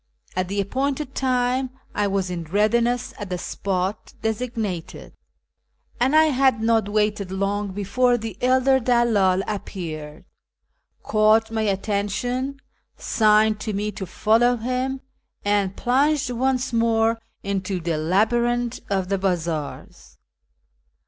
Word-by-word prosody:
At 185 0 0
the 200 +2 -2
appointed 270 +7 -2
time 255 0 0 0.2
I 205 0 +1
was 195 -2 -1
in 170 -2 -4
readiness 235 +7 +1
at 205 -3 -6
the 180 - -2
spot 190 +2 -3
designated, 220 -6 -3 0.9
and 260 +5 +2
I 315 - +7
had 265 -5 +3
not 225 -1 +2
M^aited 210 -2 0
long 200 +2 -1
before 240 +6 +1
the 220 -4 -6
elder 260 +1 +4
dcdldl 225 -6 +2
appeared, 160 -6 -6 0.8
caught 215 +1 +3
my 220 -1 -1
attention, 215 +6 -1 0.4
signed 215 -1 +3
to 215 0 -3
me 210 +2 -2
to 190 -2 -6
follow 235 +6 +3
him, 255 +3 -2 0.4
and 200 -2 +1
plunged 280 +2 +2
once 255 +1 0
more 225 0 +2 0.2
into 195 -1 -2
the 165 -2 -2
labyrinth 235 +8 +1
of 190 -2 0
the 195 -1 0
bazaars. 170 -5 -3
215 Hz, 120 wpm, -23 LUFS, 195-245 Hz, 0.9 s, I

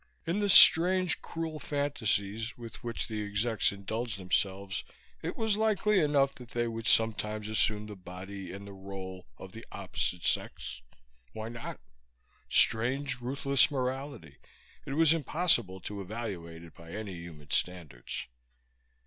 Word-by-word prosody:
In 170 +4 -1
the 205 -1 0
strange, 185 0 +8
cruel 160 -1 -5
fantasies 115 -7 -1
with 115 -2 -10
which 115 -1 -4
the 110 -2 -4
Execs 105 +2 +1
indulged 110 +3 -4
themselves 95 +1 -1 0.4
it - - -5
was 220 -2 +1
likely 210 -2 +2
enough 145 -3 +2
that 125 -3 -13
they 120 0 -1
would 115 -1 -5
sometimes 105 -1 +3
assume 110 -1 +1
the 105 -1 -9
body, 95 0 -9
and 100 +1 -9
the 100 - -9
role, 95 -2 -8
of - - -11
the - - -10
opposite 90 -2 -3
sex. 60 - -2 0.5
Why 110 +1 -6
not? 115 0 -7 0.7
Strange, 125 +4 +3
ruthless 135 +1 +3
morality; 130 - -4 0.5
it 135 - -3
was 160 +1 +5
impossible 150 - +1
to 100 +1 -6
evaluate 90 -6 -6
it 85 - -14
by 85 0 -13
any 105 -2 -5
human 85 -4 -11
standards. 80 -9 -2
110 Hz, 140 wpm, -30 LUFS, 95-140 Hz, 0.7 s, strange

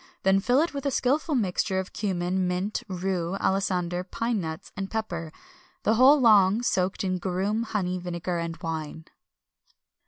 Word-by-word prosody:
Then 190 0 +4
fill 245 +7 +3
it 330 -1 -1
with 280 0 -3
a - - +3
skilful 280 +4 +1
mixture 190 -3 0
of 190 0 -3
cummin, 185 -2 -1
mint, 185 +5 -2
rue, 185 -1 -2
alisander, 180 -2 0
pine 230 +3 -2
nuts, 160 -1 -6
and 195 0 -4
pepper, 175 -8 -4 0.5
the 220 - +3
whole 265 +6 +6
long 215 -2 +5
soaked 185 -5 0
in 185 -1 -1
garum, 195 +4 -1
honey, 190 -5 -2
vinegar, 175 0 -3
and 170 0 -4
wine. 160 -1 -4
190 Hz, 155 wpm, -26 LUFS, 180-220 Hz, 0.5 s, whole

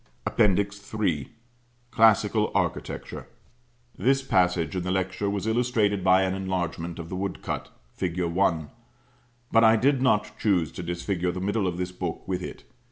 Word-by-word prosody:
'" - - -38
APPENDIX 100 0 +1
III. 85 -10 0 0.6
CLASSICAL 110 -1 +4
ARCHITECTURE. - - -3 0.7
This 135 +2 +2
passage 90 -5 +1
in 90 - -1
the 90 - -3
lecture 95 +2 -1
was 100 0 -2
illustrated 110 -4 +1
by 95 0 +5
an 95 0 0
enlargement 90 -3 -3
of 85 - -6
the - - -4
woodcut, 100 +1 -4 0.2
Fig. 90 -1 -3
1; 85 -3 0 0.8
but 115 0 +5
I 110 0 +7
did 130 +4 +2
not 105 -5 +2
choose 90 -7 +1
to - - -7
disfigure 85 +1 -2
the 90 - -5
middle 100 +1 0
of 90 -1 -2
this 90 0 -3
book 90 -2 -5
with 95 -1 -2
it. - - -8
95 Hz, 160 wpm, -26 LUFS, 90-105 Hz, 0.8 s, I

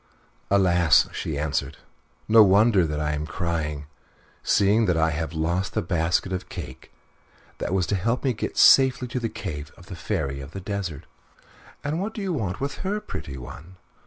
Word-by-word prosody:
"Alas!" 90 -5 +4
she 75 - -4
answered; 75 0 -2 0.5
"no 110 0 +7
wonder 100 -2 +4
that 75 -1 -3
I 75 -1 -1
am 75 +1 -3
crying, 80 -4 -3 0.6
seeing 105 +3 +3
that 90 -2 +2
I 80 0 +2
have 80 +2 -3
lost 85 +4 -1
the - - +1
basket 85 +2 0
of 90 - -5
cake 65 - -9 0.7
that - - -3
was 95 -2 +1
to 100 - -1
help 115 +7 -1
me 135 - +2
to - - -16
get - - -15
safely 130 -2 +6
to 125 - -2
the 115 -2 -2
cave 75 -7 -6
of 90 - -15
the 95 - -8
Fairy 70 -4 -3
of 75 +4 -10
the 95 - -5
Desert." 95 -5 -4 0.8
"And 150 +4 -2
what 215 +3 -4
do 215 - -4
you 190 -2 -1
want 100 - -3
with 140 +1 -3
her, 200 +3 -2
pretty 75 - -7
one?" 80 +8 -11
90 Hz, 190 wpm, -24 LUFS, 80-110 Hz, 0.8 s, no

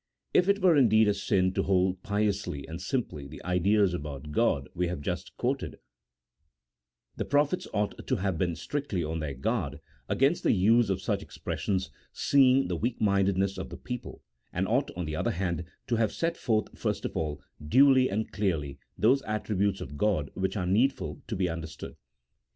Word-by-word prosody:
If 180 +2 +4
it 200 -1 +2
were 180 -3 +6
indeed 110 -5 +5
a 105 - +4
sin 95 -2 +1
to - - +1
hold 95 -1 +1
piously 100 -8 -1
and 80 +2 -7
simply 90 - -3
the 80 - -11
ideas 95 +2 +2
about 75 -3 -6
God 75 - +1
we 90 0 0
have 90 -1 -3
just 70 - -5
quoted, - - -2 1.4
the - - -1
prophets 145 +6 +1
ought 105 0 -2
to 130 - +2
have 95 -3 -1
been 85 0 0
strictly 95 - -3
on 80 +1 -3
their 75 -3 -4
guard 70 +2 -2 0.3
against 140 +6 +2
the - - +3
use 110 +3 +4
of 95 - -1
such - - 0
expressions, 95 -2 -3 0.2
seeing 135 -1 +4
the 90 - -1
weak 115 +8 -2
mindedness 100 -1 +2
of - - -5
the - - -8
people, 125 -1 -7 0.3
and 95 +2 -1
ought, 130 +6 +1
on 90 - -2
the 75 0 -3
other - - 0
hand, 85 -1 -2 0.2
to 120 - 0
have 110 -1 +2
set 165 0 -1
forth 110 -7 -1
first - - -2
of - - -4
all, 75 -2 -2 0.2
duly 130 - +5
and 110 +3 -2
clearly, 80 -9 -1 0.2
those 130 +6 +4
attributes 100 -2 0
of 70 +2 -7
God 90 -8 +1
which 95 +2 -2
are 90 - -1
needful 115 +9 +1
to 110 - -3
be 95 -2 +1
understood. 80 -2 -6
100 Hz, 180 wpm, -28 LUFS, 85-115 Hz, 1.4 s, were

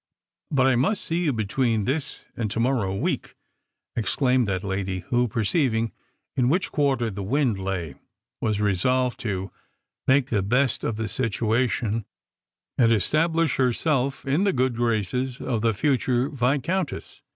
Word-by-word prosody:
" - - -66
But 135 -3 +3
I 135 - +4
must 190 - +1
see 165 - -1
you 175 -4 +1
between 110 -1 0
this 140 +2 -3
and 115 -3 -2
to 110 - -3
morrow 115 -6 +1
week," - - -2 0.6
ex 115 - 0
claimed 125 -3 +2
that 95 -1 -1
lady, 95 -1 -2
who, 120 0 +2
perceiving 115 - +1 0.4
in 125 -1 +2
which 180 +6 +1
quarter 135 -6 +1
the 100 0 -5
wind 120 0 +1
lay, 95 -6 -3 0.5
was 110 -2 0
resolved 120 +6 +1
to 95 -3 -3 0.6
ake 130 -1 +3
the 105 -4 +2
best 125 +6 +1
of 115 - -1
the 110 0 -3
situation, 115 -1 0 0.7
and 115 -2 +5
estab 155 - +2
lish 165 -4 +2
herself 135 +2 +1
in 140 +7 +2
the 200 - +2
good 130 -1 +1
graces 120 +2 -1
of 115 -4 -2
the 115 0 +3
future 130 +2 +1
Viscountess. 145 +6 -1
120 Hz, 155 wpm, -25 LUFS, 105-135 Hz, 0.7 s, and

